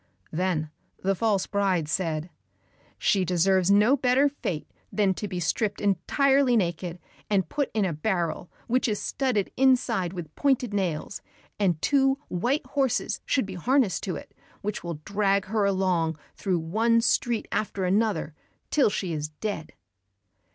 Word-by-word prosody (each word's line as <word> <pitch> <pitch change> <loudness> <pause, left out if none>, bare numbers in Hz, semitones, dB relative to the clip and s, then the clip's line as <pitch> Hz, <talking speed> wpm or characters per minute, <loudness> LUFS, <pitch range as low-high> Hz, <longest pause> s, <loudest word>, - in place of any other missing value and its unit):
Then 160 -3 -1 0.3
the 195 +1 +2
false 200 -1 +1
bride 190 -6 0
said, 160 0 -2 0.7
"She 195 -2 +2
deserves 185 +1 +2
no 210 +7 +5
better 260 +1 +3
fate 180 - -4 0.2
than 200 -3 +2
to 210 - -5
be 180 -2 -4
stripped 205 +5 -1
entirely 250 - +3
naked, 175 -2 -1 0.3
and 195 -5 +2
put 285 - -1
in 210 -3 +2
a 175 - -1
barrel 170 0 -2 0.2
which 255 +2 +1
is 210 -2 -1
studded 250 -8 -1
inside 245 -8 +3
with 165 -4 -7
pointed 260 -6 +1
nails, 185 -3 -2 0.4
and 180 -6 +2
two 270 -1 +3
white 245 - 0
horses 265 -2 0
should 265 - +2
be 195 - -7
harnessed 235 - +1
to 185 -4 -2
it, - - -10 0.3
which 210 0 -4
will 170 -3 -5
drag 200 -1 +1
her 210 +1 0
along 185 -5 +1 0.2
through 185 -3 0
one 220 +8 +2
street 235 -1 +1
after 200 -3 -1
another, 195 -5 +1 0.4
till 285 -7 +4
she 185 -3 -2
is 150 -1 -3
dead." 160 0 -5
195 Hz, 150 wpm, -26 LUFS, 175-230 Hz, 0.7 s, no